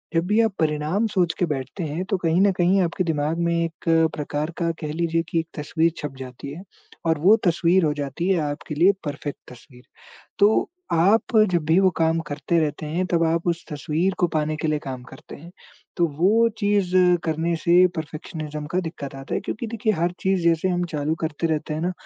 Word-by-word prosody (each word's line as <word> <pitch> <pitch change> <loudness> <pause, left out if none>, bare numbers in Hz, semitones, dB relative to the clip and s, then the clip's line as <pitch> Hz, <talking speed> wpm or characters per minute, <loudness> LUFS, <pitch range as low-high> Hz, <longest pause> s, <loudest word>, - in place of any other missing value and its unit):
जब 165 +1 +2
भी 210 +3 +2
आप 225 -3 +1
परिणाम 155 +6 0
सोच 180 -5 +1
के 180 - +3
बैठते 135 +4 -4
हैं, 160 +3 -3
तो 190 +1 -1
कहीं 170 0 +1
न 200 0 +5
कहीं 185 +2 +3
आपके 175 +1 0
दिमाग 155 0 -1
में 170 - +1
एक 165 0 -2 0.3
प्रकार 150 +1 -3
का 170 -1 0
कह 150 -2 -3
लीजिए 165 0 0
कि 165 - +1
एक 165 - -4
तस्वीर 160 +2 +1
छप 145 -2 -6
जाती 130 +1 -8
है 165 - -8 0.5
और 160 -1 +2
वो 190 +8 +6
तस्वीर 175 +2 +3
हो 150 - +1
जाती 145 +4 -3
है 190 -3 +3
आपके 145 +1 -4
लिए 175 +6 +5
परफेक्ट 145 0 -4
तस्वीर। 125 0 -16 0.6
तो, 205 +2 +4 0.2
आप 200 +8 +3
जब 170 -3 0
भी 165 +3 +4
वो 190 -1 +4
काम 165 0 +2
करते 150 +4 -1
रहते 155 0 -2
हैं, 170 +5 -1
तब 170 -2 +1
आप 165 +1 0
उस 170 0 -1
तस्वीर 155 +6 -1
को 175 - +3
पाने 155 -1 -1
के 155 - -2
लिए 155 0 +1
काम 130 -3 -6
करते 130 +1 -12
हैं, 170 +4 -13 0.5
तो 175 - +3
वो 220 +7 +4
चीज़ 205 -3 +1 0.3
करने 165 +1 0
से 175 +2 +5
परफेक्शनिज़्म 155 -1 -6
का 185 - +2
दिक्कत 160 -5 -7
आता 135 0 -5
है, - - 0
क्योंकि 235 - -5
देखिए 220 -1 0
हर 170 +1 0
चीज़ 190 -1 +1
जैसे 170 +2 +2
हम 180 -1 0
चालू 150 +1 0
करते 160 +1 -2
रहते 155 -1 -2
हैं 155 - -3
ना, 180 +2 0
165 Hz, 210 wpm, -23 LUFS, 150-180 Hz, 0.6 s, वो